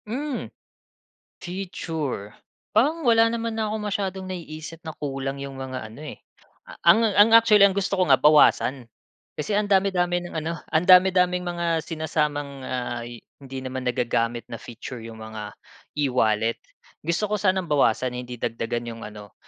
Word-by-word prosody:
Hmm, 270 +4 -4 0.9
feature, 165 - -4 0.5
parang 300 +9 +3
wala 230 -4 +5
naman 230 0 -2
na 220 - 0
akong 215 - -3
masyadong 190 -2 -3
naiisip 165 -3 -7
na 160 - -5
kulang 135 -1 -4
'yung 140 -1 -7
mga 130 -4 -6
ano, 115 +7 -12
eh. - - -19 0.6
Ang 170 +7 +7 0.2
ang 205 +2 +7
actually 220 -3 +7
ang 200 - +3
gusto 195 0 -1
ko 185 - +3
nga 135 -4 +4
bawasan, 145 -3 +4 0.5
kasi 200 +7 -2
ang 210 - +1
dami, 200 -1 +3
dami 175 -1 0
ng 175 -2 -7
ano, 160 +1 -2 0.2
ang 160 +2 +1
dami-daming 180 -1 +5
mga 170 -2 -1
sinasamang, 150 -3 -2
ah, 125 -2 -3 0.4
hindi 135 -1 -8
naman 130 0 -4
nagagamit 120 -1 -1
na 115 -2 -8
feature 120 +1 -8
'yung 115 0 -9
mga 110 -1 -8 0.4
e-wallet. 115 -5 +1 0.4
Gusto 205 +5 -1
ko - - +3
sanang 190 -2 +2
bawasan 130 -5 +2
hindi 125 0 -6
dagdagan 120 +1 -3
'yung 115 - -11
ano, 105 -2 -10
155 Hz, 155 wpm, -24 LUFS, 125-190 Hz, 0.9 s, Ang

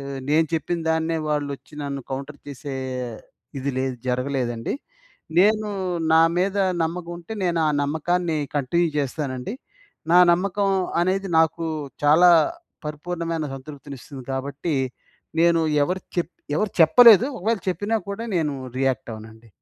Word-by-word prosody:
ఆహ్, 140 0 -6
నేను 160 +1 +4
చెప్పిందాన్నే 160 0 0
వాళ్ళోచ్చి 145 0 -3
నన్ను 140 -1 -4
కౌంటర్ 140 +2 -6
చేసే 140 0 -6 0.8
ఇది 140 +2 -2
లేదు, 130 -1 -1
జరగలేదండి. 125 - -1 0.6
నేను 215 +3 +4 0.4
నా 160 0 +7 0.2
మీద 195 +2 0 0.3
నమ్మకం 170 +1 -4
ఉంటే, 175 +6 -9
నేనా 170 -2 +1 0.2
నమ్మకాన్ని 160 +3 0 0.2
కంటిన్యూ 170 +6 +1
జేస్తానండి. 140 - -3 0.6
నా 180 - +8
నమ్మకం 195 +3 0 0.3
అనేది, 190 +2 0
నాకు 160 +1 +1 0.4
చాలా 170 +5 +7 0.6
పరిపూర్ణమైన 165 +1 -3
సంతృప్తినిస్తుంది 135 -1 -10
గాబట్టి, 140 +4 -3 0.7
నేను 170 -1 +4 0.2
ఎవరు 185 +4 -2 0.2
చెప్ 170 -1 0 0.3
ఎవరు 210 +1 0
చెప్పలేదు, 225 +8 +8
ఒకవేళ 220 +3 0
చెప్పినా 205 +4 -1
గూడా, 210 +3 -4
నేను 150 -3 0 0.2
రియాక్టవనండి. 115 -3 -3
160 Hz, 115 wpm, -23 LUFS, 140-175 Hz, 0.8 s, నా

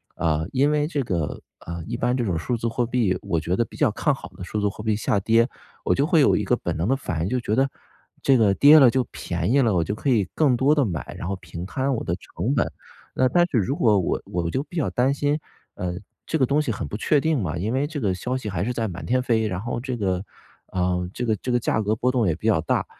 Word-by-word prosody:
呃， 80 -1 0
因 140 +3 +2
为 150 0 +1
这 150 -3 -1
个， 85 -10 -2 0.2
呃， 85 0 -5
一 120 - -3
般 125 +1 +1
这 125 - 0
种 90 -5 0
数 120 +9 -1
字 115 - -2
货 120 +1 0
币 115 -5 +1
我 95 -5 -1
觉 85 +4 -1
得 115 - +2
比 - - -15
较 145 -7 +3
看 145 +7 +1
好 105 - -10
的 90 -1 -10
数 105 +4 -3
字 105 - +2
货 100 - -9
币 110 -1 +1
下 105 -1 0
跌， 115 +4 +3 0.4
我 - - +2
就 140 - +2
会 165 0 +3
有 140 - +5
一 - - -1
个 - - +2
本 - - -3
能 85 +4 -1
的 135 - +3
反 90 - -3
应 90 - -1
就 125 - 0
觉 110 -3 -1
得 135 +2 +2 0.5
这 135 - +4
个 105 -4 +4
跌 145 +9 +8
了 135 -4 +8
就 130 +2 +1
便 85 +3 -2
宜 140 - +4
了， 115 -5 +2
我 85 - +2
就 100 - -3
可 135 - -2
以 110 -6 +3
更 145 -5 +3
多 135 +4 +4
地 145 - +3
买， 85 - -5
然 - - -5
后 100 - -1
平 85 -1 -8
摊 130 +8 -1
我 - - -3
的 85 - -1
成 120 +6 -3
本。 120 - +1 0.4
那 130 - +3
但 175 +6 +4
是 135 - 0
如 115 +6 +1
果 110 -8 +3
我 90 - -1
我 85 -1 -2
就 130 +10 -1
比 155 - -14
较 155 - +1
担 130 +3 +1
心， 145 +2 0 0.4
呃， 90 -1 -3 0.3
这 160 - -1
个 135 - +3
东 140 +4 +2
西 140 - -1
很 105 - -4
不 105 - -5
确 145 +7 +2
定 160 -4 +1
嘛， 85 -3 -2
因 100 +6 -2
为 135 +3 +1
这 155 -1 -5
个 100 -5 +1
消 125 +8 -3
息 120 -5 -5
还 90 -2 -2
是 125 - -1
在 115 -2 -1
满 90 -2 -7
天 125 +2 +1
飞， 115 -3 +1
然 95 -2 -3
后 120 +1 -3
这 130 +1 -4
个， 95 -4 -1 0.4
啊， 90 -1 0 0.2
这 125 - -3
个 110 -2 +1
这 125 - -4
个 120 - +3
价 110 - 0
格 105 +1 0
波 125 +3 +1
动 120 -5 +1
也 80 - +1
比 90 - -11
较 105 -8 +4
大， 80 - 0
115 Hz, 305 characters per minute, -24 LUFS, 95-130 Hz, 0.5 s, 跌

